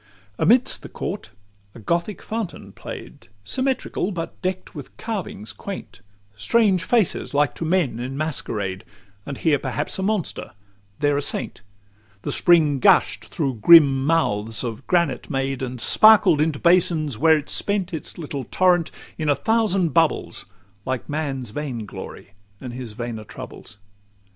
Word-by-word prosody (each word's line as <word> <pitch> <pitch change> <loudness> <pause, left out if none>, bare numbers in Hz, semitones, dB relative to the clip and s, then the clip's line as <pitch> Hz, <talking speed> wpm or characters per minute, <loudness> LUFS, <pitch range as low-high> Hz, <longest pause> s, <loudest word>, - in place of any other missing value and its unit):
LXV 100 -1 -30
Amidst 250 +4 +3
the - - -10
court 200 - -5 0.5
a - - -10
Gothic 170 - -2
fountain 220 -4 -5
play'd, - - -10 0.2
Symmetrical, 260 - -1
but 165 -3 -6
deck'd 185 0 -3
with 145 -4 -10
carvings 185 - -5
quaint 195 - -8 0.3
Strange 190 - +2
faces, 210 -6 0
like 145 -2 +2
to - - -6
men 160 -9 +1
in 130 +2 -5
masquerade, 105 -11 -2 0.4
And 140 -2 -5
here 150 -4 +2
perhaps 145 +6 -2
a - - -1
monster, 200 - -2 0.5
there 145 -1 +2
a - - 0
saint: - - -2 0.6
The - - -2
spring 160 -6 +4
gush'd - - +3
through 135 -6 -3
grim 140 -3 +7
mouths 115 -9 +1
of 115 +1 -6
granite 175 -2 0
made, 135 -2 -2
And 125 -1 -4
sparkled 200 - +6
into 155 -2 +1
basins, 165 -6 +2
where 160 0 +5
it 150 - -6
spent 200 -3 +1
Its 160 - -6
little 145 -5 -5
torrent 180 -3 +2 0.3
in 155 -1 -1
a 145 - +4
thousand 195 - +1
bubbles, - - 0 0.4
Like 130 +4 -4
man's 140 -6 -3
vain 125 -4 -4
glory, 100 - -10 0.3
and 125 -2 -7
his 125 -3 -7
vainer 120 -1 -5
troubles. 100 - -11
150 Hz, 150 wpm, -22 LUFS, 125-180 Hz, 0.6 s, grim